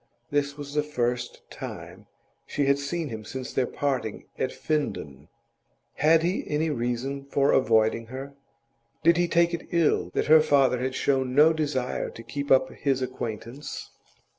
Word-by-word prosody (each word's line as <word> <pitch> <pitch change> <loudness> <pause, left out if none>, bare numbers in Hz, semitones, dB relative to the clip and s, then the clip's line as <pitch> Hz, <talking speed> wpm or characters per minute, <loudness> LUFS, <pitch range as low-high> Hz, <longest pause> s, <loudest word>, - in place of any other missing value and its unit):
This 145 0 0
was 145 -1 -7
the 150 - +2
first 120 -4 -3
time - - -8 0.4
she 145 - 0
had 140 0 +3
seen 155 +2 -3
him 110 -2 -6
since 130 +3 -6
their 130 -2 +1
parting 130 -7 -2
at - - +1
Finden. 75 - -3 0.7
Had 160 +2 +4
he 180 +3 0
any 155 +2 0
reason 130 +2 -2
for 140 0 +2
avoiding 115 -2 +3
her? 135 +3 -7 0.7
Did 170 +2 +5
he 175 0 +2
take 170 0 +3
it 170 - -4
ill 170 -3 +2
that - - +1
her 155 +1 +7
father 135 -4 +3
had 130 +1 -2
shown 130 -2 0
no 155 +3 +7
desire 145 -5 -2
to 115 - -11
keep 140 +5 -5
up 130 0 +5
his 135 -2 -1
acquaintance? 125 +2 -6
140 Hz, 160 wpm, -26 LUFS, 125-150 Hz, 0.7 s, her